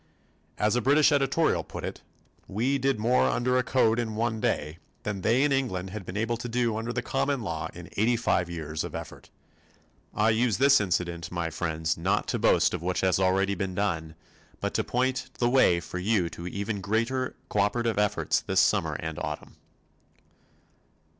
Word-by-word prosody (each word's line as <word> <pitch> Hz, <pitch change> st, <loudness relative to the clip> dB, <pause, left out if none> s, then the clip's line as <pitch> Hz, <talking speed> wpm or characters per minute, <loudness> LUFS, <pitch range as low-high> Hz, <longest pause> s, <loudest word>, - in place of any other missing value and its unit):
As 105 Hz, +2 st, +2 dB
a 125 Hz, -, +2 dB
British 145 Hz, +5 st, +4 dB
editorial 145 Hz, +3 st, +2 dB
put -, -, -8 dB
it, -, -, -5 dB, 0.5 s
we 125 Hz, +8 st, 0 dB
did 135 Hz, -1 st, +1 dB
more 120 Hz, +4 st, +3 dB
under 125 Hz, +1 st, +1 dB
a -, -, +1 dB
Code 120 Hz, -3 st, +2 dB
in 110 Hz, -2 st, -2 dB
one 110 Hz, 0 st, -1 dB
day 75 Hz, +3 st, -1 dB, 0.2 s
than 100 Hz, -2 st, -3 dB
they 120 Hz, +8 st, +3 dB
in 145 Hz, -, +2 dB
England 95 Hz, -9 st, -1 dB
had 100 Hz, -3 st, -7 dB
been 95 Hz, -, -5 dB
able 115 Hz, +2 st, 0 dB
to 120 Hz, +1 st, -6 dB
do 120 Hz, -1 st, 0 dB
under 115 Hz, +2 st, -3 dB
the -, -, -2 dB
common 135 Hz, -2 st, -1 dB
law 85 Hz, -6 st, -3 dB
in -, -, -9 dB
eighty 115 Hz, +4 st, +3 dB
five 90 Hz, -6 st, +1 dB
years 80 Hz, -2 st, -4 dB
of -, -, -6 dB
effort. -, -, -8 dB, 0.9 s
I 110 Hz, +1 st, +3 dB
use 115 Hz, -1 st, +2 dB
this 140 Hz, -3 st, +5 dB
incident, 85 Hz, -3 st, -2 dB
my 85 Hz, -2 st, -2 dB
friends, 80 Hz, -1 st, -2 dB
not -, -, +1 dB
to -, -, -1 dB
boast -, -, +3 dB
of -, -, -3 dB
what 90 Hz, +1 st, -1 dB
has 95 Hz, 0 st, +2 dB
already 95 Hz, +1 st, +2 dB
been 95 Hz, -2 st, -3 dB
done 85 Hz, -6 st, -2 dB, 0.4 s
but -, -, -2 dB
to -, -, +1 dB
point 130 Hz, +1 st, -1 dB
the 120 Hz, -, +2 dB
way 120 Hz, -9 st, +4 dB
to 90 Hz, -, -7 dB
you 95 Hz, -3 st, +1 dB
for 85 Hz, -, -7 dB
even 100 Hz, +2 st, -3 dB
greater 115 Hz, +6 st, -1 dB
cooperative 105 Hz, +2 st, 0 dB
efforts 105 Hz, -1 st, +1 dB
this -, -, +1 dB
summer -, -, +2 dB
and 80 Hz, -1 st, -4 dB
autumn. -, -, -5 dB
110 Hz, 185 wpm, -27 LUFS, 90-125 Hz, 0.9 s, this